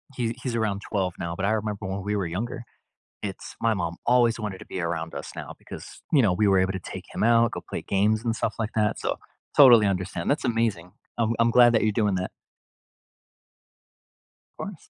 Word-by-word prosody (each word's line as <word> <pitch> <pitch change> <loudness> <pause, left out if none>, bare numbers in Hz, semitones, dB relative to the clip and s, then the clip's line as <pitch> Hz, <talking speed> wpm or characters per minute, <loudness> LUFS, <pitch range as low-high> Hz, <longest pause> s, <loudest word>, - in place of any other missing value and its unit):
he 115 -2 -2
he's 125 -3 -3
around 105 -3 -1
12 95 -4 -1
now, 85 0 -3
but 95 +1 -2
I 105 - +2
remember 105 -2 -2
when 95 +1 -3
we 105 +1 -1
were 100 - -1
younger, 110 +7 -4 0.6
it's 100 -2 -6
my 115 -1 +2
mom 85 -3 -3
always 120 -1 +3
wanted 105 -3 -4
to - - -12
be 95 - -5
around 85 -1 -3
us - - -7
now - - -7
because, - - -11
you 140 -5 +5
know, 100 - +3
we 105 +4 +2
were 95 -1 +4
able 95 +1 +1
to 95 - -3
take - - -8
him - - -3
out, 115 0 +4
go - - -4
play - - -4
games 105 +3 +1
and 115 -1 0
stuff 110 - -2
like 110 -1 -2
that, 105 -1 +1
so, - - -2 0.4
totally 120 -7 +8
understand. 90 -3 -2
That's 145 0 0
amazing. 110 -7 -1 0.3
I'm 115 0 +1
I'm 115 0 +4
glad 120 0 +6
that 115 - +3
you're 110 -1 +2
doing 105 -2 +1
that. 90 0 -3 2.3
Course. - - -8
105 Hz, 210 wpm, -25 LUFS, 95-115 Hz, 2.3 s, totally